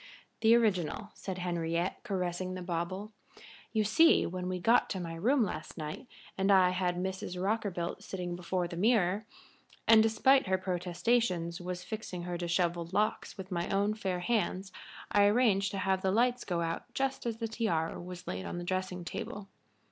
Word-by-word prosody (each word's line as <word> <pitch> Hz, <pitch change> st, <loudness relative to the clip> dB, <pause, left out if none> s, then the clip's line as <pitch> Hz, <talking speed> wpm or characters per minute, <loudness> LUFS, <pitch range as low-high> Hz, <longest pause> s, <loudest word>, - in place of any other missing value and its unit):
"The 225 Hz, +1 st, +6 dB
original," 205 Hz, -3 st, +1 dB
said 190 Hz, -2 st, -6 dB
Henriette, 170 Hz, -1 st, -1 dB
caressing 185 Hz, -1 st, -2 dB
the 185 Hz, -, -5 dB
bauble. 180 Hz, +4 st, -3 dB, 0.6 s
"You 220 Hz, -2 st, +2 dB
see, 320 Hz, +11 st, +5 dB
when 180 Hz, +1 st, -3 dB
we 185 Hz, -, -1 dB
got 230 Hz, +7 st, +3 dB
to 190 Hz, -, -2 dB
my 170 Hz, -2 st, -5 dB
room 235 Hz, +10 st, +2 dB
last 200 Hz, -, -5 dB
night 155 Hz, -, -6 dB, 0.3 s
and 195 Hz, +1 st, +3 dB
I 185 Hz, -2 st, +6 dB
had 180 Hz, -1 st, 0 dB
Mrs. 185 Hz, 0 st, -4 dB
Rockerbilt 190 Hz, -3 st, -1 dB
sitting 180 Hz, -2 st, -4 dB
before 180 Hz, 0 st, -2 dB
the 170 Hz, -, -7 dB
mirror, 205 Hz, 0 st, +2 dB, 0.6 s
and 225 Hz, -1 st, +8 dB
despite 225 Hz, +4 st, +4 dB
her 190 Hz, 0 st, +2 dB
protestations 180 Hz, 0 st, 0 dB
was 180 Hz, 0 st, -5 dB
fixing 190 Hz, -4 st, -5 dB
her 175 Hz, 0 st, -3 dB
dishevelled 175 Hz, 0 st, -1 dB
locks 210 Hz, +1 st, 0 dB
with 190 Hz, 0 st, -8 dB
my 175 Hz, -1 st, -1 dB
own 200 Hz, +2 st, +2 dB
fair 190 Hz, -4 st, -2 dB
hands, 195 Hz, -3 st, 0 dB, 0.4 s
I 205 Hz, -1 st, +5 dB
arranged 205 Hz, -2 st, +3 dB
to 200 Hz, -, -5 dB
have 190 Hz, -1 st, +1 dB
the 190 Hz, -, +1 dB
lights 245 Hz, +5 st, +2 dB
go 175 Hz, -2 st, -1 dB
out 165 Hz, 0 st, -2 dB
again -, -, -35 dB
just 270 Hz, -2 st, -1 dB
as 225 Hz, -1 st, -2 dB
the 225 Hz, 0 st, -2 dB
tiara 195 Hz, -8 st, -1 dB
was 180 Hz, 0 st, -8 dB
laid 90 Hz, 0 st, -4 dB
on -, -, -4 dB
the 175 Hz, -, -4 dB
dressing 185 Hz, -1 st, -3 dB
table. 200 Hz, +3 st, -6 dB
185 Hz, 180 wpm, -31 LUFS, 175-215 Hz, 0.6 s, and